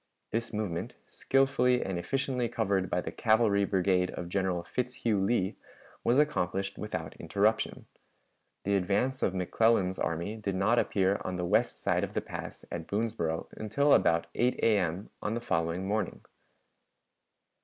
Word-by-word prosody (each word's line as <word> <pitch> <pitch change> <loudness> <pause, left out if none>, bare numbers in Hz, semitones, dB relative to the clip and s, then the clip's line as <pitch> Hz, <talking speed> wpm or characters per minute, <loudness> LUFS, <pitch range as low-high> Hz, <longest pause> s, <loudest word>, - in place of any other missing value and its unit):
This 115 +1 -2
movement, 105 -6 -3
skillfully 130 -2 +2
and 95 -2 -2
efficiently 130 +2 -1
covered 100 -5 0
by 90 - 0
the - - -5
cavalry 110 -3 +3
brigade 95 -1 +2
of 85 - -6
General 95 -2 0
Fitzhugh 120 -3 -1
Lee, 100 -2 0 0.5
was 120 - +3
accomplished 100 - +1
without 80 -7 -4
interruption. 105 +6 0 0.8
The 100 +1 +1
advance 100 +8 0
of 95 - +1
McClellan's 95 0 +2
army 85 +7 -2
did 100 -3 -3
not 105 +6 +3
appear 95 0 +1
on 95 - -3
the 90 -1 -2
west 110 +6 +1
side - - +2
of - - -4
the - - +2
pass - - -7
at 80 -1 -5
Boonsboro 100 -7 -1
until 140 +7 +2
about 85 0 +4
8 125 +1 +2
A.M. 95 -3 +1
on 105 +2 -1
the - - -1
following 85 -3 -1
morning. 105 -2 -1
100 Hz, 145 wpm, -30 LUFS, 90-115 Hz, 0.8 s, about